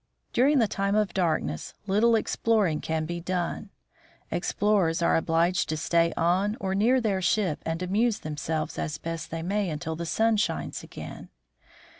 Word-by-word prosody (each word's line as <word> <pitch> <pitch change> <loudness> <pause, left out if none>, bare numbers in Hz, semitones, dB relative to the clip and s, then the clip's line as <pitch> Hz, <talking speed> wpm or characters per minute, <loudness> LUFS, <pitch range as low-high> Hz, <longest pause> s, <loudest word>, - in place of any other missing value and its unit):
During 280 +4 +4
the 230 -4 +4
time 200 0 -1
of 210 -2 +1
darkness 160 - -1
little 215 +4 +3
exploring 215 -7 +1
can 160 -1 -1
be 175 +2 -4
done. 180 +3 -3 0.6
Explorers 185 -6 +1
are - - +3
obliged 165 +2 +1
to 155 - -1
stay 170 +2 +2
on 190 +6 +1
or 190 -4 -2
near 230 +7 +3
their 205 -5 0
ship 185 -3 +1
and 165 +2 -2
amuse 210 +5 +1
themselves 155 +1 -3
as 155 -1 -3
best 165 -1 -5
they 165 0 -4
may 200 +1 0
until 160 +1 -4
the 170 +1 -5
sun 225 +5 +2
shines 170 -6 -2
again. - - -9
180 Hz, 160 wpm, -27 LUFS, 165-210 Hz, 0.6 s, During